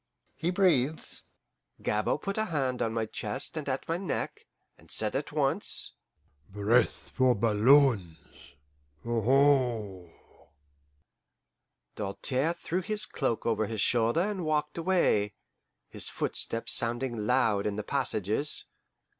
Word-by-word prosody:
He 165 - -2
breathes?" 160 -6 +1 0.6
Gabord 105 0 -1
put 200 +2 -2
a 220 - +1
hand 135 -9 -1
on 115 - 0
my 115 -1 -1
chest 105 +3 -4
and 150 -3 -4
at 130 0 -3
my 165 - 0
neck, 185 -4 -4 0.3
and - - -21
said - - -1
at - - -2
once, - - 0 0.6
"Breath 105 +5 +1
for 130 -2 +3
balloons 110 - +4 0.9
aho!" 120 -6 +2 1.8
Doltaire 130 +9 -1
threw 175 +1 -3
his 210 +3 -1
cloak 130 -6 -2
over 110 -2 +1
his 110 -2 -3
shoulder 120 +5 +2
and 195 -1 -2
walked 150 0 -1
away, 160 - +2 0.5
his - - -3
footsteps 115 - -2
sounding 120 -2 -1
loud 105 -2 +2
in 105 - -2
the 105 - -3
passages. 125 +1 0
125 Hz, 120 wpm, -29 LUFS, 105-150 Hz, 1.8 s, balloons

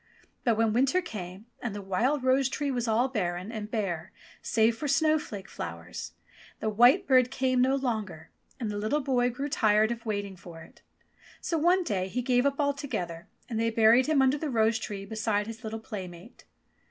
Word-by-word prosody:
But 230 -3 +2
when 225 -1 +2
winter 270 +9 +3
came 200 - -7 0.2
and 225 -4 -4
the 205 - -5
wild 245 +9 0
rose 260 +1 +3
tree 285 0 -2
was 245 -2 -2
all 230 +3 +2
barren 185 -5 -3
and 215 -2 -5
bare 190 -6 -3 0.3
save 225 +1 +2
for 295 +6 -4
snowflake 290 - +1
flowers, 85 +1 -7 0.5
the 220 - -1
white 245 - +5
bird 255 -4 +4
came 255 -1 +1
no 265 +2 +3
longer 215 -11 -3 0.3
and 225 -4 -2
the 205 - -3
little 220 +9 0
boy 250 -2 +1
grew 275 +4 -4
tired 215 -4 +3
of 235 -1 -5
waiting 205 -2 -3
for 170 -2 -11
It. - - -18 0.6
So 330 - -1
one 355 +4 +3
day 190 - -1
he 250 +6 -3
gave 250 +1 +3
up 280 +1 -2
altogether, 275 - -2 0.2
and 230 -3 -3
they 230 0 +2
buried 230 +3 +5
him 300 -4 +3
under 265 +2 +2
the 310 - -3
rose 220 -2 +2
tree 200 -3 -6
beside 215 -1 -1
his 225 0 -9
little 220 0 -4
playmate. 190 -1 -9
225 Hz, 190 wpm, -28 LUFS, 205-265 Hz, 0.6 s, white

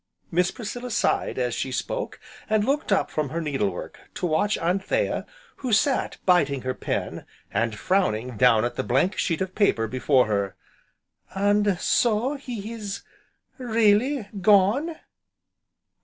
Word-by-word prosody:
Miss 180 +2 +2
Priscilla 245 +2 -6
sighed 225 - 0
as 125 -2 0
she 130 - -3
spoke, - - -3 0.3
and 215 -1 +2
looked 280 -1 0
up 195 - +2
from 150 -3 -1
her 165 - -3
needle 155 +4 0
work - - -8 0.2
to - - -2
watch 175 +6 +1
Anthea 190 - 0 0.3
who 255 -3 -4
sat 260 +6 +2
biting 145 -8 +3
her 130 0 -1
pen, - - -3 0.3
and 115 -1 0
frowning 125 - 0
down 115 0 +4
at 120 - -4
the - - 0
blank 135 +11 +1
sheet 165 -2 0
of 190 -1 -2
paper 200 - +2
before 130 +2 +2
her. 100 -2 -1 0.8
"And 205 -1 +2
so, 240 +3 +2
he 235 -6 -6
is 205 -4 -6 0.6
really 230 +1 +2
gone?" 210 - +4
195 Hz, 140 wpm, -25 LUFS, 135-220 Hz, 0.8 s, down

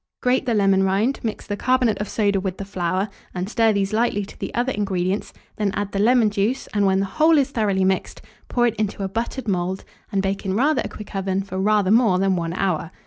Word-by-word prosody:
Grate 255 +1 +1
the 235 - +2
lemon 195 -2 +3
rind, 200 +8 +1
mix 220 -2 -4
the 205 - -3
carbonate 250 -1 +1
of 210 - -4
soda 200 -3 +1
with 190 -1 -3
the 195 - -5
flour, 185 0 -1 0.3
and 180 +1 -2
stir 225 +1 +3
these 200 0 -1
lightly 215 -3 +1
to - - -14
the - - -4
other 245 +2 +1
ingredients; 195 -2 -1 0.3
then 210 -2 0
add 205 -1 -2
the 195 - -2
lemon 230 0 +4
juice, 210 +6 0
and, 205 -2 +2
when 190 0 +2
the 195 - +1
whole 315 +10 +3
is 280 -1 +2
thoroughly 205 -6 +1
mixed, 190 0 -1 0.3
pour 240 -1 +1
it 230 -2 +1
into 205 -1 -2
a - - 0
buttered 230 +5 -4
mould, 185 -1 -1 0.3
and 195 -2 0
bake 195 0 -2
in 190 -1 -1
rather 290 +7 +2
a - - -5
quick 210 - -10
oven 195 0 -1
for 190 -1 -5
rather 205 -1 +2
more 220 -5 +4
than 190 0 +2
1 170 -2 -2
hour. 180 -3 -1
200 Hz, 235 wpm, -22 LUFS, 190-225 Hz, 0.3 s, lemon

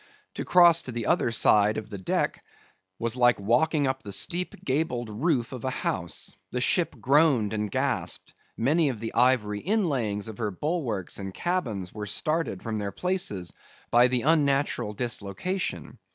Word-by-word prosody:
To - - -4
cross 170 -2 +6
to 130 - -6
the 120 -2 -4
other - - +2
side 105 -2 +4
of 110 0 -6
the 100 - -6
deck 95 - -1 0.5
was 115 +1 -2
like 120 -2 +4
walking 140 +9 +2
up 130 0 -1
the 105 - -8
steep 175 - +2
gabled 130 -5 -1
roof 125 +1 0
of 125 -3 -7
a 130 - 0
house. - - -3
The 125 - -3
ship 165 +5 +2
groaned 135 -4 +3
and 105 -1 -2
gasped. - - -2 0.2
Many 150 +6 +2
of 120 -5 -4
the 115 0 -5
ivory 115 -5 +2
inlayings 135 - -1
of 110 +1 -9
her 110 -2 -1
bulwarks 115 - -3
and 95 -1 -6
cabins 115 - -2
were 105 -1 -6
started 155 - -2
from 110 -1 -3
their 100 -1 -3
places, 105 - -2 0.4
by 120 +1 +6
the 125 -1 0
unnatural 140 -7 +1
dislocation. 120 - -3
120 Hz, 165 wpm, -26 LUFS, 105-155 Hz, 0.5 s, cross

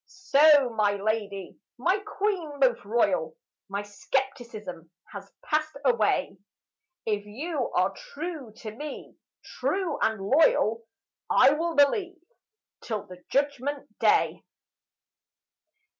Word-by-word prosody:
So 300 -7 +5
my 210 -2 +2
lady, 200 -2 -3 0.2
my 360 +11 +2
queen 390 -7 -2
most 255 -3 +3
royal, 200 -7 0 0.3
My 200 +1 -3
skepticism 210 - -4 0.2
has 200 -1 -9
passed 310 -1 -1
away; 225 -5 +2 0.7
If 210 -2 -1
you 275 +4 -3
are 185 +2 +2
true 300 -6 -7
to 215 - -6
me, 295 +4 -8 0.3
true 375 -3 -2
and 220 -2 +1
loyal, 230 -1 +3 0.5
I - - +6
will 330 +2 -1
believe 355 +6 +3 0.6
till 215 -4 -4
the 180 0 -13
Judgment 285 0 -1
day. - - +3
250 Hz, 105 wpm, -27 LUFS, 205-305 Hz, 0.7 s, I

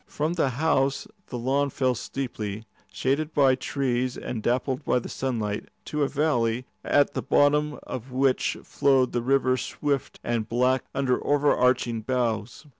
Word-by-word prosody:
From 155 +3 -1
the 160 -6 +1
house 135 0 +1 0.2
the 125 - -5
lawns 135 +3 0
fell 130 -2 +2
steeply, 110 -4 -5 0.3
shaded 150 +4 -1
by 135 -3 +5
trees 130 -2 -1
and 115 - -4
dappled 130 +4 0
by - - +2
the 120 - -3
sunlight, 110 -6 -3 0.2
to 150 - -3
a 140 - +3
valley, 125 -5 0 0.2
at 145 0 +3
the - - -2
bottom 150 +1 +2
of 130 0 -7
which 130 0 +1
flowed 135 -3 +2
the 120 - -1
river 130 0 +2
swift 140 0 -2
and 115 -2 -1
black 125 +2 +2
under 130 -2 +1
overarching 125 -5 +2
boughs. 120 0 -2
130 Hz, 150 wpm, -26 LUFS, 120-140 Hz, 0.3 s, by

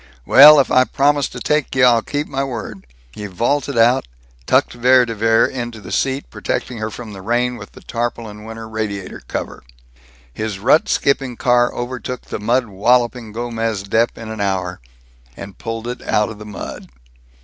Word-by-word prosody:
"Well, 150 +2 +9
if 135 - +1
I 130 0 +5
promised 145 +1 +1
to - - -6
take 150 +4 -1
you, 130 -1 +5
I'll 120 -2 +5
keep 145 +5 -3
my 135 -2 -3
word." 115 - -6 0.2
He 105 +6 -7
vaulted 120 +8 -1
out, 120 - +3 0.4
tucked - - +2
Vere 125 +1 +4
de 115 - -4
Vere 115 +1 +3
into 120 -3 -5
the - - -10
seat, 135 +1 -1
protecting 120 -3 -3
her 110 0 -3
from 110 0 -9
the 95 - -9
rain 120 +4 0
with - - -11
the - - -14
tarpaulin 115 -3 -4
winter 110 0 -8
radiator 110 -3 -5
cover. - - -5 0.7
His 110 - -4
rut 125 +10 +3
skipping 135 -3 0
car 120 -1 +3
overtook 125 +1 -5
the - - -6
mud 120 +4 +1
walloping 120 +3 +1
Gomez 115 -2 -3
Dep 110 +4 0
in 110 -1 -7
an 110 -2 -5
hour, 95 -2 -2 0.6
and 100 -1 -10
pulled 115 0 -5
it 125 0 -5
out 105 +1 0
of 110 -2 -9
the 105 - -9
mud. 105 - -8
115 Hz, 180 wpm, -19 LUFS, 110-125 Hz, 0.7 s, Well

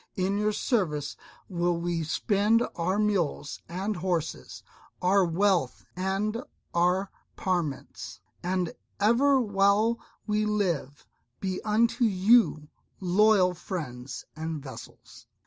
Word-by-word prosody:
In 195 +2 0
your 210 0 +2
service 165 - -1 0.3
will 175 -2 0
we 170 -1 -1
spend 205 +8 +2
our 180 +3 0
mules 185 -8 0
and 195 +5 -2
horses, 175 -3 -3 0.4
our 190 +2 +4
wealth 175 -4 +1
and 195 +5 -1 0.3
our 180 +3 +2 0.2
parments, 140 - -3 0.2
and 180 -1 -1 0.3
ever 255 +7 +4
while 210 +1 +2 0.3
we 210 0 +1
live 180 -10 -1 0.3
be 190 -1 -3
unto 230 +3 +2
you 200 -5 +4 0.3
loyal 190 0 +4
friends 135 -8 -6
and 160 0 -4
vassals." 135 - -11
185 Hz, 105 wpm, -28 LUFS, 170-210 Hz, 0.4 s, our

